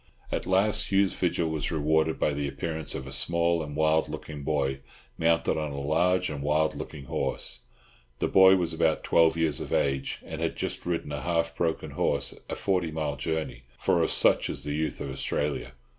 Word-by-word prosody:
At - - -2
last 105 +3 +2
Hugh's 100 -1 +3
vigil 85 -2 0
was 80 +1 -2
rewarded 80 0 +1
by 75 - +1
the 70 0 -2
appearance 80 +3 -3
of 65 - -5
a 65 - -8
small 85 0 +2
and 75 -2 -6
wild 80 +1 +2
looking 75 -2 -7
boy, 70 -2 -1 0.4
mounted 80 -1 +2
on 75 -1 -3
a 70 - -5
large 90 +6 +2
and 70 -2 -5
wild 75 +2 +1
looking 75 -3 -8
horse. - - -3 0.6
The - - 0
boy 95 0 +7
was 85 -3 -1
about 80 0 +1
twelve 80 0 +4
years 80 -4 +1
of - - -6
age, 70 -1 0
and - - -6
had - - -1
just - - -4
ridden 85 -4 -2
a 70 -2 -3
half 85 +1 0
broken 80 -2 -1
horse - - 0
a - - -2
forty 90 -4 0
mile 75 -2 -2
journey—for 70 -5 -2
of - - +2
such - - +4
is - - -1
the 75 - -3
youth 80 +1 -2
of 70 - -4
Australia. 70 0 -2
80 Hz, 190 wpm, -27 LUFS, 75-85 Hz, 0.6 s, boy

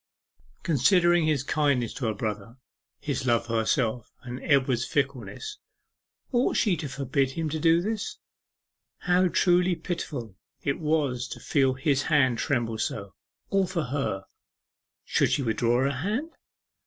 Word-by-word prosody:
Considering 175 +3 +4
his 150 -4 +1
kindness 140 -6 +1
to 125 - -3
her 110 - 0
brother, 105 +2 -4 0.4
his 135 -3 -2
love 115 -1 +2
for 115 -1 -1
herself, 115 0 0
and 125 0 -7
Edward's 130 -4 +2
fickleness, 140 - -3 0.7
ought 245 -1 +2
she 200 -5 +3
to 150 -4 -5
forbid 135 0 -1
him 160 0 -2
to 155 +1 -3
do 165 +2 +4
this? 215 +2 -3 0.8
How 180 0 +3
truly 180 0 +3
pitiful 140 - -5 0.3
it 140 +3 -1
was 150 -6 0
to - - -8
feel 135 -3 +2
his 135 0 +1
hand 130 -6 +2
tremble 115 -6 -1
so 100 -3 -3 0.4
all 195 -1 +2
for 175 -3 -2
her! 130 -8 -2 0.8
Should - - +2
she 140 - +1
withdraw 120 +2 +1
her 140 - +2
hand? 210 - -2
140 Hz, 140 wpm, -27 LUFS, 120-165 Hz, 0.8 s, Considering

